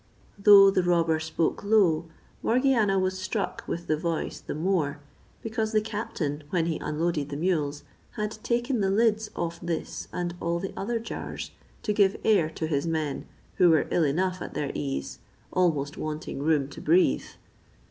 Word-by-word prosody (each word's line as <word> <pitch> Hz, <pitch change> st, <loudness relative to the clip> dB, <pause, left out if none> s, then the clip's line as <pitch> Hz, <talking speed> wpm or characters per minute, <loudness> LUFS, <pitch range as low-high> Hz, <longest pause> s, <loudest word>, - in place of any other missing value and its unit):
Though 200 Hz, -1 st, +8 dB
the 190 Hz, -, +2 dB
robber 170 Hz, -2 st, +2 dB
spoke 160 Hz, +3 st, -1 dB
low, 190 Hz, -7 st, +3 dB, 0.4 s
Morgiana 235 Hz, -5 st, +3 dB
was 185 Hz, 0 st, 0 dB
struck 195 Hz, +2 st, -3 dB
with 170 Hz, 0 st, -4 dB
the 155 Hz, -, +1 dB
voice 165 Hz, 0 st, -2 dB
the -, -, -6 dB
more, 155 Hz, -3 st, 0 dB, 0.4 s
because 220 Hz, 0 st, -2 dB
the 215 Hz, -, +5 dB
captain, 210 Hz, -9 st, -3 dB
when 170 Hz, -1 st, +1 dB
he 165 Hz, -2 st, -1 dB
unloaded 150 Hz, -1 st, -1 dB
the 140 Hz, -, -4 dB
mules, 150 Hz, -4 st, -1 dB, 0.3 s
had 210 Hz, -1 st, -2 dB
taken 240 Hz, +1 st, 0 dB
the 195 Hz, -2 st, +1 dB
lids 215 Hz, +1 st, +2 dB
off 170 Hz, 0 st, -3 dB
this 170 Hz, -2 st, -4 dB
and 175 Hz, -1 st, -3 dB
all 170 Hz, 0 st, -1 dB
the 190 Hz, +2 st, -5 dB
other 230 Hz, +4 st, -2 dB
jars 230 Hz, 0 st, -6 dB, 0.3 s
to 210 Hz, -, 0 dB
give 200 Hz, -2 st, +3 dB
air 200 Hz, -8 st, +3 dB
to 160 Hz, -, -4 dB
his 150 Hz, 0 st, -1 dB
men, 155 Hz, -3 st, -2 dB, 0.3 s
who 180 Hz, -2 st, +6 dB
were 160 Hz, -2 st, +3 dB
ill 175 Hz, -, +3 dB
enough 180 Hz, +5 st, 0 dB
at -, -, -7 dB
their 145 Hz, -, -2 dB
ease, 70 Hz, -2 st, -4 dB, 0.3 s
almost 150 Hz, -5 st, +1 dB
wanting 155 Hz, -2 st, -4 dB
room 150 Hz, -2 st, +2 dB
to 145 Hz, -, -10 dB
breathe. 170 Hz, +4 st, +3 dB
175 Hz, 170 wpm, -27 LUFS, 155-205 Hz, 0.4 s, Though